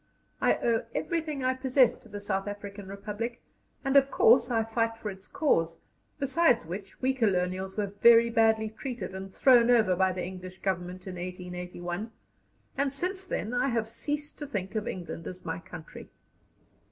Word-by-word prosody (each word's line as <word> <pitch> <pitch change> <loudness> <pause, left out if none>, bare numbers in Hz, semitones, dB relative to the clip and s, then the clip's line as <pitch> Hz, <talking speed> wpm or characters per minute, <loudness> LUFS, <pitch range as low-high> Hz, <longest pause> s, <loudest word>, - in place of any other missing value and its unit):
I - - +4
owe 230 -1 +1
everything 315 -5 -2
I 255 0 +2
possess 260 -1 +3
to 225 - -18
the 205 0 -6
South 195 -1 -2
African 205 -1 -7
Republic, 210 +4 -5 0.5
and 270 +1 +1
of 275 -1 +6
course 240 0 +5
I 225 -2 +2
fight 225 0 -1
for 210 -2 -4
its 190 0 -12
cause; 165 - +1 0.4
besides 275 - +3
which, 190 +4 -7
we 265 +1 +3
colonials 190 -5 0
were 200 -2 -2
very 235 0 +7
badly 220 -1 +3
treated 240 -3 -5
and 190 0 -7
thrown 245 +1 +5
over 220 -7 +5
by 190 +1 +3
the 180 -1 -3
English 185 0 -8
Government 180 -1 -3
in 185 -2 -6
1881, 180 +2 -5 0.7
and 275 0 +1
since 370 +7 -1
then 230 -8 -3
I 245 - +2
have 230 -4 0
ceased 295 +6 -4
to 295 - -5
think 195 -7 -4
of 215 -2 -2
England 175 -2 -5
as 185 -1 -8
my 160 0 -3
country." 165 -2 -10
215 Hz, 170 wpm, -29 LUFS, 185-245 Hz, 0.7 s, very